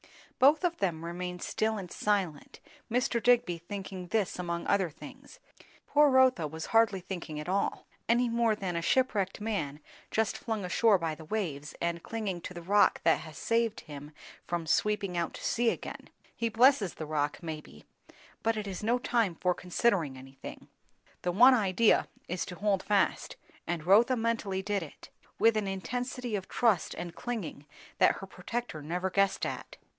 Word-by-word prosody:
Both 290 +7 +5
of 345 -1 +1
them 170 -4 -1
remained 180 +1 -5
still 220 0 0
and 185 -4 -7
silent, 190 -8 -1 0.3
Mr. 235 0 +1
Digby 230 -8 +3
thinking 190 0 -7
this 210 -2 -1
among 170 -1 -3
other 195 -3 +2
things; 155 - -13 0.5
poor 295 0 +5
Rotha 260 - +4
was 160 +2 -6
hardly 225 -4 +4
thinking 175 -4 -6
at 150 - -6
all, 195 +2 -1 0.2
any 240 +1 +4
more 230 -1 +2
than 190 -4 -4
a 170 - 0
shipwrecked 205 -2 +1
man 195 -10 -2 0.3
just 220 -1 0
flung 220 -4 -3
ashore 205 +3 +4
by 165 -3 -2
the 160 +1 -10
waves, 155 -7 -3
and 170 0 -1
clinging 205 -5 -4
to 180 - -8
the 175 - -7
rock 205 +4 +4
that 165 - +4
has 155 -3 -10
saved 230 -1 0
him 145 -1 -10 0.4
from 170 -1 -2
sweeping 200 +2 +1
out 170 -2 -2
to - - -7
sea 235 0 +2
again, - - -6 0.3
lie 230 - +2
blesses 230 - +4
the 155 - -5
rock, 150 -1 -1
maybe, 155 -2 -8 0.6
but 225 0 +1
it 210 - -3
is 195 0 -5
no 235 +3 +2
time 230 -7 +1
for 180 +2 +1
considering 180 - 0
anything. 135 +1 -10 0.5
The 180 - 0
one 245 +8 +7
idea 215 -1 +3 0.2
is 180 +1 -2
to 180 - -7
hold 200 0 +1
fast; 205 -1 +1 0.3
and 170 -3 -3
Rotha 220 +7 +5
mentally 225 -5 -1
did 205 0 -1
it, 160 - -11 0.3
with 225 0 +4
an 215 -2 0
intensity 245 +5 -3
of 190 -2 -4
trust 220 -8 +1
and 175 -1 -6
clinging 200 -12 -5 0.3
that - - +5
her 195 - -7
protector 190 -1 -5
never 180 +5 -2
guessed 195 0 +2
at. - - -6
195 Hz, 170 wpm, -30 LUFS, 170-225 Hz, 0.6 s, one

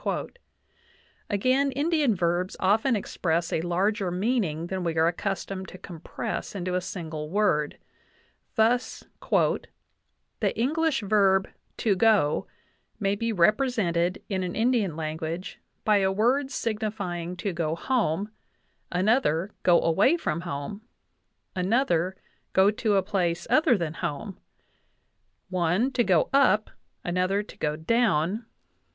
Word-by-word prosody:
Again, 255 +7 +2
Indian 290 -4 +2
verbs 175 +1 -1
often 220 +6 +3
express 170 -4 -1
a - - +1
larger 190 +3 0
meaning 180 -4 0
than 185 +1 -3
we 165 -2 -2
are 160 - +4
accustomed 190 +2 -2
to - - -10
compress 170 +2 -6
into 185 -1 -3
a 180 - +1
single 160 -4 -6
word; 175 -6 +1 0.8
thus 240 +2 +1 1.4
"the - - -1
English 305 +2 +1
verb 195 -2 +3 0.3
to 210 -4 +2
go 200 -7 +3 0.5
may 195 -2 +1
be 230 +3 -1
represented 185 -4 +1
[in 190 -2 -1
an 180 -1 -3
Indian 225 -7 +1
language] 160 +3 -4 0.3
by 210 -1 +5
a 190 -1 +2
word 250 +7 +2
signifying 205 -8 -3
to 190 +2 -2
go 165 -2 -1
home; 210 -2 0 0.6
another, 190 - +2
go 175 -2 +5
away 205 - +3
from 170 - -2
home; 175 +4 -5 0.7
another, 185 -2 +1 0.4
go 190 +2 +5
to 215 -1 0
a 195 - +3
place 175 -3 -1
other 285 -7 +5
than 165 -4 -3
home;... 165 +6 -5 1.1
one, 185 +7 +1
to 250 -2 +2
go 185 -7 +3
up; 215 -6 +4 0.3
another, 185 +3 0
to - - -13
go 150 0 0
down 205 +2 +1
190 Hz, 120 wpm, -26 LUFS, 170-220 Hz, 1.4 s, by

